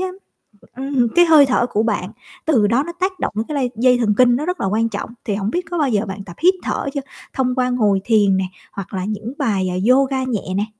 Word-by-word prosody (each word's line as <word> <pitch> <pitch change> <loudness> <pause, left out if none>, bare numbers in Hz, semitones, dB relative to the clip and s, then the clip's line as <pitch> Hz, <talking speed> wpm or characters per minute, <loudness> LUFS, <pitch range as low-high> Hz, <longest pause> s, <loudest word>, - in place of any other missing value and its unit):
á, 375 - -1 0.7
ừm, 265 -2 0
cái 350 - +6
hơi 315 -4 +7
thở 255 -2 +1
của 215 - 0
bạn, 210 -4 -2 0.3
từ 235 -10 +3
đó 240 +6 +2
nó 340 - -6
tác 370 -1 -1
động - - -2
cái 305 - -4
lây 260 -3 0
dây 250 +2 +4
thần 225 -4 +1
kinh, 245 -1 +5
nó 295 +5 -2
rất 360 0 -3
là - - 0
quan 225 +3 0
trọng. 205 +1 -5 0.2
Thì 205 - -1
hổng 200 0 -2
biết 355 - 0
có 350 - -2
bao 290 -5 +1
giờ 210 -1 0
bạn 195 0 -7
tập 175 -3 -11
hít 370 +2 +6
thở - - -2
chưa? 280 - -2 0.3
Thông 255 -1 0
qua 255 -1 +1
ngồi 210 -6 +1
thiền 205 -4 +3
nè 190 - 0 0.3
hoặc 200 -1 -8
là 185 -1 -3
những 215 +4 -5
bài, 195 -4 0
à, 180 - -3
yoga 265 0 +3
nhẹ 215 -7 -3
nè? 205 - 0
240 Hz, 255 wpm, -19 LUFS, 205-275 Hz, 0.7 s, hơi